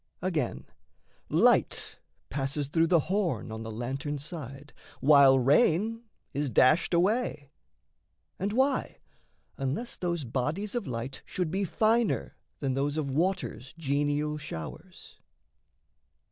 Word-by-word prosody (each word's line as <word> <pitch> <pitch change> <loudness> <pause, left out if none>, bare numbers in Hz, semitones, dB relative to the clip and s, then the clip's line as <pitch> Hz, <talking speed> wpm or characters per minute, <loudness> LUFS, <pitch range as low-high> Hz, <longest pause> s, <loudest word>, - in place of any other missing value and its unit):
Again, 150 - -1 0.6
light - - +2 0.3
passes 140 +1 -1
through 165 +4 +2
the 170 -2 +4
horn 185 - -1
On 110 0 -5
the 110 - -6
lantern's 135 +6 -4
side, 145 -3 -8 0.3
while 140 -1 +7
rain 175 - +3 0.3
is 145 0 -1
dashed 155 - +4
away. 175 - 0 0.9
And 200 +2 -1
why? 265 +4 +1 0.6
unless 135 - -3
those 170 -3 -2
bodies 145 - -2
of 240 -6 -2
light 125 +2 -5
should 180 -4 -3
be 195 +2 0
Finer 220 +4 +1 0.3
than 135 -2 0
those 140 +3 -1
of 140 -3 -1
water's 165 -4 -2
genial 145 0 0
showers. 80 - -9
150 Hz, 115 wpm, -29 LUFS, 135-180 Hz, 0.9 s, while